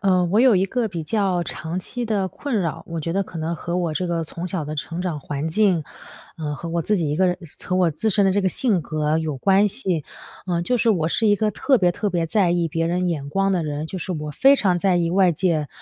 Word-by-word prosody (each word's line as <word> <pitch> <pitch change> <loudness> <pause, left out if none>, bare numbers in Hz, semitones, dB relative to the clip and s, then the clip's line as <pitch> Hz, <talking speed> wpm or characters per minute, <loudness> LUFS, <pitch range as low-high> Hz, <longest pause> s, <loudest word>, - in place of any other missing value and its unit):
呃， 185 -3 +3
我 195 +5 +2
有 255 -3 +6
一 190 0 +3
个 235 +4 -1
比 170 -5 -5
较 190 0 0
长 165 +2 -4
期 245 +6 -4
的 205 -4 0
困 240 - -2
扰。 165 -4 -3
我 165 -1 -4
觉 165 +2 -3
得 195 +2 +1
可 175 - -10
能 160 +1 -2
和 175 +2 -3
我 175 -3 -1
这 180 - -1
个 170 -1 -1
从 170 +2 -6
小 175 -4 -2
的 155 +1 -5
成 165 +4 -4
长 170 -5 -2
环 145 +2 -4
境， 185 -1 +2 0.6
呃， 150 -2 -3
和 165 +4 -7
我 170 +1 -1
自 210 +5 +1
己 165 -5 -1
一 150 - -1
个 185 +2 +3
人 180 - +1 0.3
和 180 - -1
我 180 -2 +3
自 160 +9 -1
身 205 -1 +3
的 195 - +4
这 200 +2 +2
个 190 - +2
性 205 -2 +1
格 155 0 -1
有 155 -3 -2
关 195 +8 +3
系。 190 - -2 0.4
呃， 175 -2 0
就 250 +8 +1
是 235 0 +1
我 170 -7 +2
是 220 - +1
一 205 - +5
个 215 +1 0
特 265 +7 +2
别 180 -3 +3
特 205 +4 -2
别 170 -2 0
在 185 -2 +2
意 175 -1 +1
别 165 +1 -1
人 180 +2 0
眼 145 -5 -3
光 195 +5 +1
的 180 -4 0
人， 150 0 -3
就 185 - -5
是 185 - -3
我 150 -2 -4
非 270 - +5
常 190 -9 +2
在 185 0 +2
意 170 -1 +1
外 185 -1 +4
界 160 -4 0
180 Hz, 290 characters per minute, -22 LUFS, 160-195 Hz, 0.6 s, 有